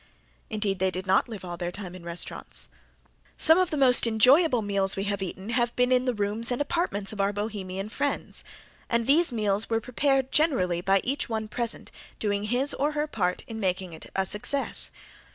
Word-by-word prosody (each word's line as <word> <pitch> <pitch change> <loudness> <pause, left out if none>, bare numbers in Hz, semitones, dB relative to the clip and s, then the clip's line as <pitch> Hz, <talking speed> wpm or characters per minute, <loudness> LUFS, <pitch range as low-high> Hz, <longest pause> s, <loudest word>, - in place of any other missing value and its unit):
Indeed 210 -3 -2
they 190 0 +2
did 185 +1 -5
not 190 +6 +2
live 210 -5 -7
all 175 -1 -6
their 175 0 -3
time 180 -1 -7
in 185 -2 -11
restaurants. 170 0 -3 0.7
Some 320 +3 +5
of 370 -2 +2
the 305 - -2
most 255 -3 +5
enjoyable 250 +3 +4
meals 200 -1 +2
we 195 - -2
have 200 -1 -2
eaten 190 +2 -6
have 240 0 0
been 250 0 +2
in 255 0 +3
the 250 - +1
rooms 210 +3 -1
and 245 - -1
apartments 285 - -2
of 205 - -2
our 200 +1 +1
Bohemian 200 -2 -4
friends, 280 +6 -2 0.5
and 235 -1 +1
these 310 +4 +4
meals 210 -2 0
were 225 -1 +1
prepared 265 +2 0
generally 185 - +2
by 195 +1 +2
each 275 0 -2
one 220 -1 -3
present 235 +1 0 0.3
doing 205 -1 -1
his 250 +6 +2
or 295 +2 -1
her 300 0 0
part 185 -11 -2
in 225 -1 -7
making 185 -3 -2
it 160 - -12
a 190 - +1
success. 210 +8 +1
215 Hz, 195 wpm, -26 LUFS, 195-255 Hz, 0.7 s, Some